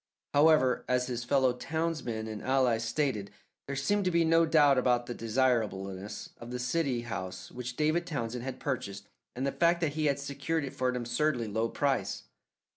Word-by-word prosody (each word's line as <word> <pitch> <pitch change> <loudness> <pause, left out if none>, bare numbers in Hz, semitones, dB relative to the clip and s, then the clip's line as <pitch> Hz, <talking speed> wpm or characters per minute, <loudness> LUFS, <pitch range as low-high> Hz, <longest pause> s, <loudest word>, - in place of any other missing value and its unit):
However, 145 -3 +4
as 125 0 +2
his 120 -2 -3
fellow 130 0 +3
townsmen 140 -5 -3
and 110 -1 -6
allies 130 -4 +2
stated, 115 -5 -1 0.4
there 140 - -3
seemed 200 +10 +1
to - - +3
be 170 -1 +3
no 165 0 +4
doubt 145 -4 +5
about 125 -1 +2
the 120 - -4
desirableness 110 -5 -1
of 115 - -9
the 125 - -3
city 125 0 0
house 95 -5 -6
which 125 0 -6
David 155 +4 +1
Townsend 125 -6 -3
had 130 0 -5
purchased 100 -7 -4 0.3
and 130 +2 -2
the 140 - +1
fact 170 +2 +3
that 155 -4 0
he 155 0 0
had 140 -1 +2
secured 140 +3 -2
it 135 - -7
for 130 -2 0
an 125 - -2
absurdly 120 +1 0
low 110 +2 -1
price. 140 +1 -1
130 Hz, 185 wpm, -30 LUFS, 120-150 Hz, 0.4 s, doubt